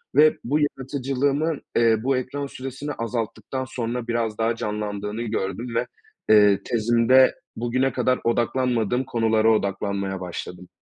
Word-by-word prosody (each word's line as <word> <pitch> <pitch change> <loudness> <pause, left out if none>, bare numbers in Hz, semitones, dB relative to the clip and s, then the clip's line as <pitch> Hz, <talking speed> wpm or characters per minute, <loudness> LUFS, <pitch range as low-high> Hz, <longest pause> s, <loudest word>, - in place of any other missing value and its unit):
ve 155 +2 +6
bu 145 +6 +1
yaratıcılığımın, 140 +2 -1 0.2
eee, 115 -1 +4
bu 135 0 +2
ekran 140 +2 -3
süresini 135 +3 -6
azalttıktan 115 +3 -4
sonra 120 -1 -4
biraz 115 -2 -1
daha 115 +1 +1
canlandığını 105 0 -4
gördüm 115 +2 -3
ve, 120 +1 0 0.4
eee, 105 -2 +6
tezimde 120 +3 +4 0.2
bugüne 125 +3 0
kadar 130 0 +1
odaklanmadığım 120 0 +1
konulara 110 -1 +2
odaklanmaya 100 -2 -1
başladım. 90 0 -7
120 Hz, 120 wpm, -24 LUFS, 110-130 Hz, 0.4 s, ve